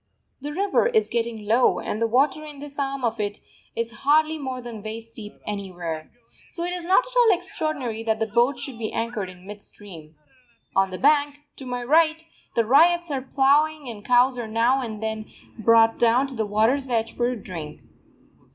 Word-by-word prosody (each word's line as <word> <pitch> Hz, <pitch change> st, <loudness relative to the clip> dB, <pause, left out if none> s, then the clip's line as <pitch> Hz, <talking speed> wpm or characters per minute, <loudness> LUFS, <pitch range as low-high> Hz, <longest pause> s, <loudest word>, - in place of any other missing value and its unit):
The 290 Hz, +2 st, -5 dB
river 395 Hz, +8 st, +1 dB
is 450 Hz, -2 st, +1 dB
getting 230 Hz, -2 st, -2 dB
low, 230 Hz, +4 st, +3 dB
and 215 Hz, -, -4 dB
the 230 Hz, -, +3 dB
water 270 Hz, +6 st, +2 dB
in 300 Hz, -2 st, -9 dB
this 285 Hz, 0 st, -9 dB
arm 275 Hz, -2 st, -2 dB
of 225 Hz, -1 st, -2 dB
it 205 Hz, -1 st, -3 dB, 0.4 s
is 230 Hz, 0 st, -4 dB
hardly 310 Hz, +2 st, +3 dB
more 260 Hz, -2 st, -4 dB
than 240 Hz, -3 st, -8 dB
waist 225 Hz, +2 st, -8 dB
deep 210 Hz, -2 st, -9 dB
anywhere. 175 Hz, -6 st, -5 dB, 0.4 s
So 340 Hz, -, -5 dB
it 355 Hz, +1 st, -2 dB
is 355 Hz, -1 st, -3 dB
not 380 Hz, +8 st, +3 dB
at -, -, -11 dB
all 480 Hz, -3 st, +6 dB
extraordinary 310 Hz, -10 st, -3 dB
that 220 Hz, -1 st, 0 dB
the 220 Hz, -, +1 dB
boat 240 Hz, +5 st, +2 dB
should 245 Hz, -2 st, -6 dB
be 220 Hz, -2 st, -3 dB
anchored 225 Hz, -4 st, -3 dB
in 180 Hz, 0 st, -14 dB
mid 205 Hz, +1 st, -9 dB
stream. 165 Hz, -8 st, -13 dB, 0.6 s
On 195 Hz, 0 st, +3 dB
the 185 Hz, -, -5 dB
bank, 290 Hz, +2 st, +2 dB, 0.2 s
to 265 Hz, -, -8 dB
my 245 Hz, -1 st, -3 dB
right, 315 Hz, +4 st, +3 dB, 0.3 s
the 230 Hz, -, +2 dB
ryots 340 Hz, +6 st, +4 dB
are 270 Hz, -2 st, -1 dB
ploughing 285 Hz, +3 st, +2 dB
and 210 Hz, -3 st, -8 dB
cows 250 Hz, +1 st, +3 dB
are 235 Hz, -, -4 dB
now 235 Hz, +5 st, +2 dB
and 220 Hz, -3 st, -6 dB
then 220 Hz, 0 st, -3 dB, 0.3 s
brought 225 Hz, 0 st, +4 dB
down 240 Hz, +3 st, +4 dB
to 270 Hz, -2 st, -8 dB
the 220 Hz, -2 st, -1 dB
water's 230 Hz, +6 st, +1 dB
edge 230 Hz, -2 st, -1 dB
for 240 Hz, 0 st, 0 dB
a 250 Hz, -, -2 dB
drink. 165 Hz, -8 st, -8 dB
240 Hz, 195 wpm, -24 LUFS, 220-290 Hz, 0.6 s, all